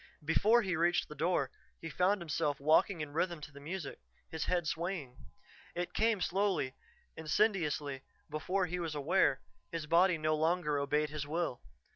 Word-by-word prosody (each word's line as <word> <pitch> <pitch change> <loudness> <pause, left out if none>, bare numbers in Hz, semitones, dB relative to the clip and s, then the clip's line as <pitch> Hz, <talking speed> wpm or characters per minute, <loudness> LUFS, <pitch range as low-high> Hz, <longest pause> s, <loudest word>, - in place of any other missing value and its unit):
Before 215 +9 +4
he 190 -3 -1
reached 175 +1 +2
the 150 - -8
door, 150 -3 0 0.3
he 165 - -6
found 195 +2 +2
himself 150 -2 -1
walking 155 +4 +3
in 145 -1 -5
rhythm 170 +1 0
to 145 - -9
the 140 - -12
music, 155 +1 -6 0.3
his 160 -1 -2
head 175 -2 0
swaying. 165 -5 -3 0.6
It 175 0 -3
came 220 -3 +2
slowly, 190 -9 0 0.4
insidiously; 155 -5 0 0.3
before 185 +5 -1
he 180 +1 -3
was 165 -3 -3
aware, 145 -1 +2 0.3
his 165 -2 -3
body 170 +2 +4
no 155 0 +1
longer 155 -2 +1
obeyed 150 +1 0
his 150 -2 -4
will. 160 -5 -2
165 Hz, 160 wpm, -33 LUFS, 150-180 Hz, 0.6 s, Before